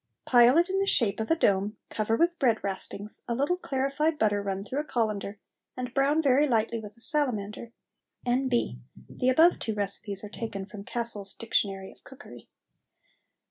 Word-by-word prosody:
Pile 245 Hz, +3 st, +6 dB
it 345 Hz, +1 st, +4 dB
in 385 Hz, 0 st, 0 dB
the 390 Hz, -, 0 dB
shape 225 Hz, -, +2 dB
of 220 Hz, -, -3 dB
a 325 Hz, -, +4 dB
dome, 205 Hz, -6 st, +1 dB
cover 220 Hz, +1 st, 0 dB
with 340 Hz, +5 st, +1 dB
bread 235 Hz, -5 st, +2 dB
raspings, 200 Hz, +1 st, -3 dB
a 235 Hz, -, -1 dB
little 285 Hz, +8 st, +1 dB
clarified 280 Hz, +1 st, -1 dB
butter 205 Hz, -4 st, +2 dB
run 195 Hz, 0 st, -3 dB
through 260 Hz, +7 st, -3 dB
a -, -, -1 dB
colander, 215 Hz, -6 st, -2 dB, 0.4 s
and 250 Hz, -1 st, -5 dB
brown 285 Hz, +4 st, +2 dB
very 280 Hz, +2 st, +4 dB
lightly 230 Hz, -2 st, +1 dB
with 210 Hz, +1 st, -10 dB
a -, -, -19 dB
salamander. 230 Hz, -7 st, -1 dB, 0.5 s
N.B. 245 Hz, -, 0 dB, 0.3 s
The 255 Hz, -, -1 dB
above 320 Hz, +7 st, +5 dB
two 220 Hz, -, -3 dB
recipes 200 Hz, 0 st, -1 dB
are 210 Hz, -, -7 dB
taken 205 Hz, -3 st, -5 dB
from 205 Hz, 0 st, -10 dB
"Cassell's 230 Hz, -5 st, -4 dB
Dictionary 195 Hz, -4 st, -1 dB
of -, -, -22 dB
Cookery." 275 Hz, +1 st, -13 dB
235 Hz, 175 wpm, -28 LUFS, 205-275 Hz, 0.5 s, Pile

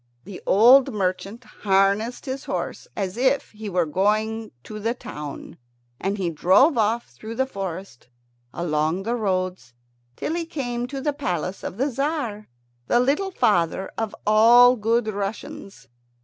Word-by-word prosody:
The 190 Hz, 0 st, -10 dB
old 245 Hz, +7 st, +6 dB
merchant 195 Hz, +3 st, -3 dB
harnessed 200 Hz, +5 st, 0 dB
his 270 Hz, +1 st, -5 dB
horse, -, -, -4 dB
as 195 Hz, 0 st, -3 dB
if 265 Hz, +3 st, +1 dB
he 215 Hz, -1 st, -7 dB
were 180 Hz, -2 st, +1 dB
going 215 Hz, +6 st, 0 dB
to 215 Hz, -1 st, -8 dB
the 225 Hz, +3 st, -1 dB
town; 150 Hz, -, -8 dB, 0.4 s
and 195 Hz, +2 st, -2 dB
he 180 Hz, -4 st, -1 dB
drove 195 Hz, -, +4 dB
off 225 Hz, +1 st, 0 dB
through 215 Hz, -, -9 dB
the 265 Hz, +2 st, +1 dB
forest, 190 Hz, -, -7 dB, 0.4 s
along 160 Hz, +2 st, -1 dB
the 230 Hz, +3 st, -1 dB
roads, 185 Hz, -, -2 dB, 0.4 s
till 315 Hz, -, -3 dB
he 335 Hz, -1 st, -3 dB
came 245 Hz, -6 st, -3 dB
to 270 Hz, +1 st, -6 dB
the 295 Hz, +1 st, 0 dB
palace 185 Hz, -, -3 dB
of 185 Hz, -, -6 dB
the 260 Hz, -, +1 dB
Tzar, 265 Hz, -6 st, -2 dB, 0.4 s
the 240 Hz, -, +3 dB
little 285 Hz, +10 st, +1 dB
father 190 Hz, -, +1 dB
of 225 Hz, -2 st, -3 dB
all 235 Hz, +4 st, +7 dB
good 230 Hz, +1 st, 0 dB
Russians. 200 Hz, -1 st, -6 dB
215 Hz, 150 wpm, -23 LUFS, 190-245 Hz, 0.4 s, all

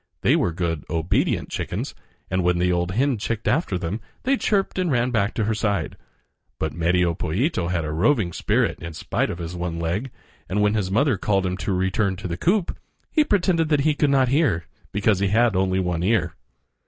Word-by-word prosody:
They -, -, +4 dB
were 85 Hz, -, +1 dB
good, 85 Hz, -3 st, -2 dB
obedient 80 Hz, 0 st, 0 dB
chickens, -, -, -4 dB, 0.4 s
and 95 Hz, -1 st, +1 dB
when 90 Hz, 0 st, +2 dB
the 90 Hz, +1 st, +2 dB
old 90 Hz, +1 st, 0 dB
hen 130 Hz, +1 st, +1 dB
chicked 115 Hz, +1 st, -3 dB
after 130 Hz, -, +1 dB
them 90 Hz, +5 st, -4 dB, 0.2 s
they 270 Hz, +2 st, +3 dB
chirped 195 Hz, -6 st, 0 dB
and 180 Hz, -2 st, +1 dB
ran 125 Hz, -1 st, +1 dB
back 110 Hz, -2 st, 0 dB
to 110 Hz, -, 0 dB
her 110 Hz, +2 st, +1 dB
side. 100 Hz, -6 st, -1 dB, 0.6 s
But 80 Hz, -, -2 dB
Medio 85 Hz, +1 st, +2 dB
Pollito 90 Hz, -, -1 dB
had 85 Hz, -2 st, -1 dB
a 75 Hz, -, -3 dB
roving 90 Hz, -, +2 dB
spirit -, -, 0 dB
in 85 Hz, 0 st, -6 dB
spite -, -, -1 dB
of -, -, -4 dB
his 85 Hz, 0 st, -6 dB
one 85 Hz, -1 st, -3 dB
leg, 85 Hz, +10 st, -2 dB, 0.4 s
and 95 Hz, +3 st, 0 dB
when 105 Hz, 0 st, +3 dB
his 105 Hz, -4 st, 0 dB
mother 120 Hz, +3 st, +2 dB
called 100 Hz, -2 st, +1 dB
to 95 Hz, -, 0 dB
him 90 Hz, -, -3 dB
to 100 Hz, -, -3 dB
return 95 Hz, +1 st, 0 dB
to 95 Hz, 0 st, -6 dB
the 85 Hz, -, -3 dB
coop, 180 Hz, -, +1 dB, 0.4 s
he 310 Hz, -, +4 dB
pretended 180 Hz, -, +1 dB
that 150 Hz, -2 st, +3 dB
he 155 Hz, +2 st, +3 dB
could 145 Hz, 0 st, +1 dB
not 135 Hz, -2 st, +3 dB
hear, 125 Hz, -, +2 dB, 0.3 s
because 100 Hz, 0 st, +2 dB
he 100 Hz, -, +2 dB
had 110 Hz, +1 st, +3 dB
only 95 Hz, 0 st, +1 dB
one 90 Hz, -2 st, -1 dB
ear. 90 Hz, -3 st, +1 dB
100 Hz, 210 wpm, -23 LUFS, 85-125 Hz, 0.6 s, They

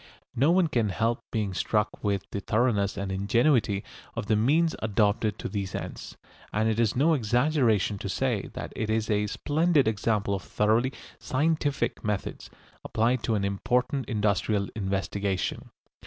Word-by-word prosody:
No 140 Hz, +6 st, +3 dB
one 180 Hz, +1 st, +4 dB
can 120 Hz, -9 st, 0 dB
help 115 Hz, +4 st, 0 dB
being 105 Hz, -4 st, -1 dB
struck 105 Hz, +2 st, -1 dB
with 100 Hz, -2 st, 0 dB
the 100 Hz, -, -2 dB
thoroughness 105 Hz, -2 st, +1 dB
and 100 Hz, -1 st, -3 dB
ingenuity 105 Hz, +1 st, +2 dB, 0.3 s
of -, -, -3 dB
the 110 Hz, -, +2 dB
means 155 Hz, +10 st, +3 dB
adopted 105 Hz, 0 st, +1 dB
to -, -, -5 dB
these 100 Hz, -4 st, -4 dB
ends, -, -, -6 dB, 0.3 s
and 110 Hz, +1 st, +1 dB
it 110 Hz, 0 st, 0 dB
is 115 Hz, -3 st, +2 dB
no 150 Hz, +6 st, +4 dB
exaggeration 120 Hz, -, +2 dB
to 100 Hz, -, -4 dB
say 120 Hz, -1 st, -1 dB
that -, -, -6 dB
it 110 Hz, -, -2 dB
is 110 Hz, 0 st, 0 dB
a 105 Hz, 0 st, +1 dB
splendid 150 Hz, +4 st, +2 dB
example 105 Hz, -1 st, 0 dB
of 95 Hz, -, -2 dB
thoroughly 110 Hz, +7 st, +1 dB, 0.3 s
scientific 145 Hz, 0 st, 0 dB
methods 105 Hz, -2 st, -3 dB, 0.3 s
applied 120 Hz, +2 st, +1 dB
to 115 Hz, -1 st, 0 dB
an 100 Hz, -2 st, 0 dB
important 125 Hz, +7 st, 0 dB
industrial 105 Hz, -2 st, 0 dB
investigation. 100 Hz, -1 st, -2 dB
110 Hz, 155 wpm, -27 LUFS, 100-125 Hz, 0.3 s, one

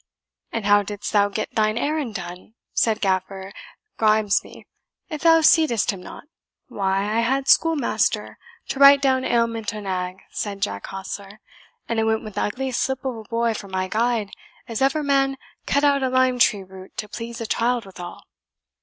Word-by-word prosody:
"And 225 Hz, -3 st, -3 dB
how 205 Hz, 0 st, +5 dB
didst 205 Hz, +1 st, -6 dB
thou 205 Hz, -1 st, +4 dB
get 210 Hz, +2 st, -4 dB
thine 215 Hz, 0 st, +1 dB
errand 285 Hz, -4 st, -1 dB
done," 180 Hz, +4 st, -8 dB, 0.2 s
said 220 Hz, -1 st, +1 dB
Gaffer 190 Hz, 0 st, -2 dB, 0.5 s
Grimesby, 215 Hz, -2 st, +1 dB, 0.4 s
"if 305 Hz, -3 st, -5 dB
thou 325 Hz, -1 st, +6 dB
seedst 310 Hz, -8 st, +4 dB
him 195 Hz, -3 st, -8 dB
not?" -, -, -10 dB, 0.5 s
"Why, 195 Hz, -1 st, 0 dB
I 215 Hz, +2 st, 0 dB
had 265 Hz, +4 st, 0 dB
schoolmaster 320 Hz, -5 st, +2 dB, 0.3 s
to 270 Hz, -, -3 dB
write 280 Hz, 0 st, +9 dB
down 265 Hz, -1 st, +2 dB
ailment 230 Hz, -2 st, 0 dB
o' -, -, -5 dB
nag," 185 Hz, -1 st, -4 dB
said 200 Hz, -2 st, -4 dB
Jack 100 Hz, 0 st, -3 dB
Hostler; 195 Hz, +2 st, -7 dB, 0.5 s
"and 230 Hz, -, -1 dB
I -, -, +2 dB
went 220 Hz, 0 st, 0 dB
wi' 215 Hz, -, -7 dB
the 205 Hz, -, -3 dB
ugliest 255 Hz, +3 st, -2 dB
slip 265 Hz, 0 st, -2 dB
of 260 Hz, -2 st, -2 dB
a 220 Hz, -, -8 dB
boy 230 Hz, +1 st, 0 dB
for 205 Hz, -2 st, -7 dB
my 185 Hz, -1 st, -2 dB
guide 225 Hz, 0 st, 0 dB, 0.4 s
as 230 Hz, 0 st, -4 dB
ever 275 Hz, +3 st, +2 dB
man 275 Hz, -1 st, +2 dB, 0.3 s
cut 280 Hz, -, +2 dB
out 280 Hz, -1 st, +4 dB
o' 260 Hz, -, +1 dB
lime 255 Hz, -1 st, +2 dB
tree 205 Hz, -4 st, +3 dB
root 190 Hz, 0 st, -13 dB
to 210 Hz, -, -4 dB
please 235 Hz, +2 st, -7 dB
a 230 Hz, -, -4 dB
child 235 Hz, +1 st, 0 dB
withal." 180 Hz, -2 st, -9 dB
220 Hz, 180 wpm, -23 LUFS, 200-260 Hz, 0.5 s, write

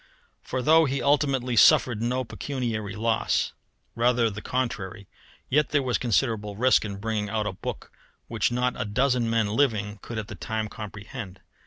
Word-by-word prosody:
For 130 Hz, -1 st, -3 dB
though 160 Hz, +3 st, +6 dB
he 135 Hz, -1 st, -1 dB
ultimately 135 Hz, -4 st, +1 dB
suffered 115 Hz, 0 st, +5 dB
no 125 Hz, +2 st, 0 dB
pecuniary 115 Hz, -5 st, -4 dB
loss, 110 Hz, +1 st, 0 dB, 0.4 s
rather 120 Hz, -1 st, +2 dB
the 105 Hz, +1 st, -7 dB
contrary, 105 Hz, -7 st, -3 dB, 0.4 s
yet 150 Hz, +2 st, +2 dB
there 145 Hz, -2 st, +1 dB
was 125 Hz, -2 st, 0 dB
considerable 110 Hz, -4 st, 0 dB
risk 125 Hz, +4 st, +4 dB
in 100 Hz, -2 st, -5 dB
bringing 105 Hz, 0 st, -2 dB
out 110 Hz, 0 st, -1 dB
a -, -, -1 dB
book -, -, -6 dB, 0.4 s
which 115 Hz, +1 st, 0 dB
not 125 Hz, +1 st, +1 dB
a -, -, +1 dB
dozen 125 Hz, +2 st, +1 dB
men 115 Hz, -2 st, +1 dB
living 105 Hz, -4 st, 0 dB
could 115 Hz, -, -7 dB
at 110 Hz, -1 st, -4 dB
the -, -, -7 dB
time 110 Hz, -1 st, -3 dB
comprehend. 105 Hz, -1 st, -8 dB
115 Hz, 165 wpm, -26 LUFS, 105-130 Hz, 0.4 s, though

